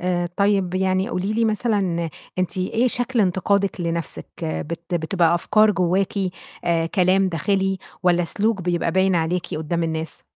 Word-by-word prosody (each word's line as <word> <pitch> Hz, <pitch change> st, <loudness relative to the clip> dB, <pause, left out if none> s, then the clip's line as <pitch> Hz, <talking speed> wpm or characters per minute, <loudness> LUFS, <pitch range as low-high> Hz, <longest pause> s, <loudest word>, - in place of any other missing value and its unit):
آآ، 175 Hz, -1 st, 0 dB
طيب 200 Hz, -3 st, +2 dB
يعني 190 Hz, +1 st, +1 dB
قولي 200 Hz, -2 st, -2 dB
لي 230 Hz, +1 st, +1 dB
مثلًا 200 Hz, -6 st, 0 dB, 0.3 s
أنتِ 185 Hz, 0 st, -1 dB
إيه 225 Hz, +7 st, +1 dB
شكل 245 Hz, 0 st, 0 dB
انتقادِك 195 Hz, +1 st, +1 dB
لنفسِك؟ 170 Hz, -1 st, -3 dB, 0.2 s
بت 165 Hz, +2 st, -4 dB
بتبقى 170 Hz, 0 st, +2 dB
أفكار 215 Hz, +5 st, +4 dB
جواكِ 190 Hz, +2 st, +1 dB, 0.5 s
آآ، 165 Hz, -1 st, +1 dB
كلام 185 Hz, +2 st, +2 dB
داخلي، 190 Hz, +3 st, 0 dB, 0.2 s
والَّا 175 Hz, -1 st, +3 dB
سلوك 205 Hz, +3 st, 0 dB
بيبقى 175 Hz, -1 st, 0 dB
باين 190 Hz, +1 st, +3 dB
عليكِ 175 Hz, +1 st, -1 dB
قدَّام 160 Hz, +2 st, -2 dB
الناس؟ 160 Hz, -1 st, -3 dB
185 Hz, 145 wpm, -22 LUFS, 170-200 Hz, 0.5 s, أفكار